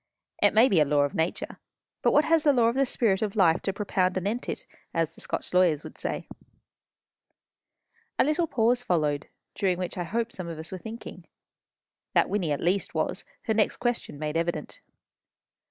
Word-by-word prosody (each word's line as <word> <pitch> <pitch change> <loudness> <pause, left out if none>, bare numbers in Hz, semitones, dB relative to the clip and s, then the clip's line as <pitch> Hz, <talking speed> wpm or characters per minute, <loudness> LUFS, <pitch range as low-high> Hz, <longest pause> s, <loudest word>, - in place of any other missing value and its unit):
It 205 0 +4
may 225 +4 +7
be 190 -9 +3
a - - +6
law 145 0 +3
of 145 0 0
nature; 160 +2 -2 0.4
but - - +3
what 295 - +4
has 330 -1 +4
the 290 - +5
Law 235 -3 +4
of - - -1
the 275 0 +2
Spirit 210 -6 +1
of 210 -1 -1
Life 175 -5 +4
to 195 - -1
propound 190 -2 0
anent 205 +6 -2
it? - - -4 0.3
as 165 -1 0
the - - -13
Scotch - - -4
lawyers 175 -5 +3
would - - -10
say." - - -4 1.9
A - - +5
little 310 +4 +1
pause 240 -2 +2
followed, 150 -9 0 0.3
during 185 -3 0
which 180 0 -4
I 175 - -2
hope 230 +6 -2
some 185 -2 -6
of 165 -2 -6
us 160 +1 -7
were 185 - -5
thinking. 225 +4 -9 0.9
That - - +4
Wynnie, 185 -7 0
at 145 - -1
least, 185 +3 0
was, - - -1 0.2
her 220 - 0
next 215 -1 +2
question 240 - -2
made 150 +1 -3
evident. 165 -2 -3
190 Hz, 190 wpm, -27 LUFS, 165-230 Hz, 1.9 s, may